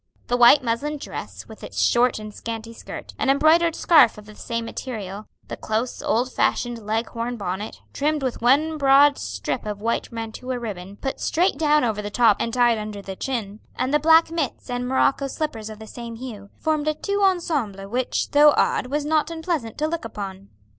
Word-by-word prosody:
The 245 Hz, -, +2 dB
white 245 Hz, +3 st, +7 dB
muslin 275 Hz, +6 st, -1 dB
dress -, -, -8 dB
with -, -, -13 dB
its -, -, -6 dB
short 245 Hz, +1 st, +3 dB
and 215 Hz, -1 st, -8 dB
scanty 230 Hz, +1 st, -6 dB
skirt, -, -, -9 dB
an 275 Hz, -, +1 dB
embroidered 320 Hz, +4 st, +4 dB
scarf 310 Hz, -11 st, +5 dB
of 210 Hz, -, -11 dB
the 215 Hz, -, -12 dB
same 230 Hz, +2 st, -4 dB
material, 210 Hz, -4 st, -6 dB, 0.2 s
the -, -, -5 dB
close, 225 Hz, +3 st, -3 dB
old 250 Hz, +3 st, 0 dB
fashioned 240 Hz, -2 st, 0 dB
leg 220 Hz, +2 st, -1 dB
horn 235 Hz, +1 st, -4 dB
bonnet, 195 Hz, +1 st, -5 dB
trimmed 300 Hz, 0 st, 0 dB
with 255 Hz, -3 st, -2 dB
one 300 Hz, +6 st, +3 dB
broad 280 Hz, +1 st, +5 dB
strip -, -, -4 dB
of 205 Hz, -1 st, -4 dB
white 230 Hz, +2 st, -2 dB
mantua 230 Hz, +3 st, -5 dB
ribbon, 200 Hz, -5 st, -6 dB
put 270 Hz, -, -4 dB
straight 355 Hz, +4 st, +1 dB
down 300 Hz, -2 st, +3 dB
over 220 Hz, -3 st, 0 dB
the 205 Hz, -, -5 dB
top 220 Hz, -1 st, +4 dB
and 230 Hz, -, -1 dB
tied 240 Hz, -2 st, +3 dB
under 210 Hz, -1 st, -6 dB
the 190 Hz, -1 st, -6 dB
chin, 215 Hz, -4 st, -4 dB, 0.2 s
and 255 Hz, +3 st, -1 dB
the 295 Hz, -, +4 dB
black 320 Hz, +2 st, +5 dB
mitts 300 Hz, -5 st, -3 dB
and 245 Hz, 0 st, -2 dB
morocco 270 Hz, +1 st, +2 dB
slippers 250 Hz, -7 st, -4 dB
of 215 Hz, -, -9 dB
the 220 Hz, -, -10 dB
same 235 Hz, +1 st, -8 dB
hue, 225 Hz, -5 st, -8 dB
formed 310 Hz, -1 st, -1 dB
a 305 Hz, -, +1 dB
tout 400 Hz, +5 st, -2 dB
ensemble 295 Hz, -, 0 dB
which, 245 Hz, +4 st, -1 dB
though 295 Hz, 0 st, +6 dB
odd, -, -, +2 dB
was 290 Hz, +2 st, -2 dB
not 310 Hz, 0 st, +1 dB
unpleasant 320 Hz, -8 st, -3 dB
to 300 Hz, -, 0 dB
look 330 Hz, -1 st, -3 dB
upon. 200 Hz, -3 st, -7 dB
245 Hz, 195 wpm, -23 LUFS, 220-295 Hz, 0.2 s, white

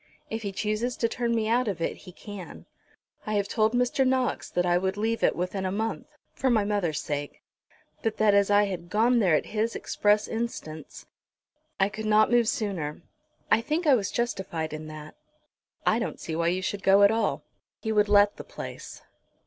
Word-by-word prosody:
If 225 Hz, +1 st, -3 dB
he 200 Hz, -2 st, -3 dB
chooses 215 Hz, +5 st, -2 dB
to 230 Hz, -, +1 dB
turn 235 Hz, 0 st, -1 dB
me 220 Hz, -1 st, 0 dB
out 240 Hz, +2 st, +2 dB
of 195 Hz, -5 st, -2 dB
it 165 Hz, -, -1 dB
he 185 Hz, -, -13 dB
can. 200 Hz, -1 st, -10 dB, 0.6 s
I 215 Hz, -, -1 dB
have 200 Hz, -1 st, +1 dB
told 220 Hz, 0 st, +1 dB
Mr. 250 Hz, +2 st, +2 dB
Knox 260 Hz, -1 st, 0 dB
that 175 Hz, -, 0 dB
I 175 Hz, 0 st, +3 dB
would 190 Hz, +2 st, 0 dB
leave 225 Hz, +2 st, -1 dB
it -, -, +3 dB
within 185 Hz, +2 st, -3 dB
a 185 Hz, -, -1 dB
month, 220 Hz, +3 st, -3 dB, 0.3 s
for 265 Hz, -, 0 dB
my 225 Hz, -4 st, +3 dB
mother's 190 Hz, -8 st, 0 dB
sake; 145 Hz, 0 st, -5 dB, 0.6 s
but 225 Hz, -1 st, -1 dB
that 215 Hz, -1 st, +4 dB
as 200 Hz, 0 st, +4 dB
I 205 Hz, 0 st, +5 dB
had 180 Hz, -4 st, -4 dB
gone 235 Hz, +5 st, +3 dB
there 185 Hz, -7 st, +4 dB
at -, -, 0 dB
his 220 Hz, +1 st, -2 dB
express 210 Hz, 0 st, +1 dB
instance, 225 Hz, -9 st, -5 dB, 0.7 s
I 195 Hz, -, +4 dB
could 215 Hz, +1 st, -5 dB
not 215 Hz, +2 st, +4 dB
move 240 Hz, -2 st, +4 dB
sooner. 190 Hz, -, -2 dB, 0.5 s
I 220 Hz, -, +5 dB
think 310 Hz, +8 st, -1 dB
I 290 Hz, -, +6 dB
was 215 Hz, -6 st, +1 dB
justified 185 Hz, -9 st, -3 dB
in 155 Hz, 0 st, -6 dB
that." 155 Hz, 0 st, -9 dB, 0.7 s
"I -, -, +3 dB
don't -, -, -4 dB
see 160 Hz, -, -5 dB
why 170 Hz, +1 st, 0 dB
you 185 Hz, +2 st, 0 dB
should 200 Hz, +1 st, -3 dB
go 195 Hz, +1 st, +5 dB
at 200 Hz, -, +7 dB
all." 225 Hz, 0 st, 0 dB, 0.4 s
"He 220 Hz, -, -3 dB
would 210 Hz, -1 st, +3 dB
let 205 Hz, 0 st, +5 dB
the -, -, -7 dB
place." -, -, -9 dB
205 Hz, 200 wpm, -27 LUFS, 185-225 Hz, 0.7 s, at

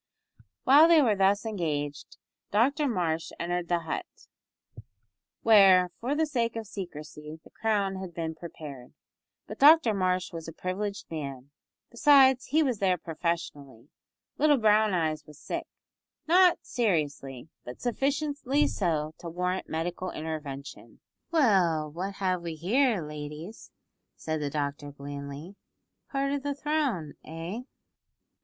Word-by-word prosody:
While 290 Hz, +5 st, +7 dB
they 330 Hz, -3 st, +6 dB
were 220 Hz, -5 st, +3 dB
thus 195 Hz, +2 st, +2 dB
engaged 150 Hz, -8 st, -3 dB, 0.3 s
Dr 280 Hz, +8 st, +2 dB
Marsh 165 Hz, -8 st, -1 dB
entered 175 Hz, 0 st, -2 dB
the 175 Hz, -1 st, +1 dB
hut, 165 Hz, -, -4 dB, 1.4 s
where, 190 Hz, -5 st, +6 dB
for 260 Hz, +5 st, -1 dB
the 320 Hz, +1 st, +2 dB
sake 235 Hz, -6 st, -1 dB
of 225 Hz, -1 st, -4 dB
secrecy, 155 Hz, -5 st, -8 dB
the -, -, -18 dB
crown 200 Hz, -3 st, 0 dB
had 190 Hz, -2 st, -6 dB
been 165 Hz, -1 st, -4 dB
prepared, 150 Hz, -6 st, -10 dB, 0.5 s
but -, -, -9 dB
Dr 290 Hz, -5 st, +7 dB
Marsh 185 Hz, -2 st, 0 dB
was 165 Hz, -1 st, -7 dB
a 165 Hz, -, -7 dB
privileged 200 Hz, +4 st, -4 dB
man, 140 Hz, -3 st, -6 dB, 0.4 s
besides 265 Hz, 0 st, +5 dB
he 310 Hz, +4 st, +3 dB
was 250 Hz, -7 st, -1 dB
there 185 Hz, -2 st, +2 dB
professionally; 155 Hz, -6 st, -4 dB, 0.5 s
little 295 Hz, -1 st, +5 dB
Brown 215 Hz, -2 st, +4 dB
eyes 155 Hz, -3 st, -1 dB
was 150 Hz, -1 st, -14 dB
sick -, -, -5 dB, 0.6 s
not 355 Hz, +1 st, +6 dB
seriously, 145 Hz, -, -2 dB
but 125 Hz, -, -9 dB
sufficiently 285 Hz, +2 st, 0 dB
so 155 Hz, -5 st, -1 dB
to 170 Hz, -, -7 dB
warrant 180 Hz, +2 st, -2 dB
medical 175 Hz, +3 st, -3 dB
intervention. 150 Hz, -3 st, -7 dB, 0.3 s
"Well, 180 Hz, -, +2 dB
what 190 Hz, +5 st, -5 dB
have 185 Hz, -2 st, -1 dB
we 170 Hz, -2 st, -5 dB
here, 215 Hz, -, +1 dB
ladies?" 150 Hz, +6 st, -8 dB, 0.5 s
said 155 Hz, -1 st, -3 dB
the 145 Hz, -, -1 dB
doctor 145 Hz, 0 st, -3 dB
blandly, 140 Hz, +5 st, -8 dB, 0.5 s
"part 275 Hz, 0 st, -1 dB
of 285 Hz, -1 st, -1 dB
the 285 Hz, 0 st, -3 dB
throne, 280 Hz, -, -1 dB
eh?" 165 Hz, +7 st, -6 dB
180 Hz, 130 wpm, -28 LUFS, 155-235 Hz, 1.4 s, While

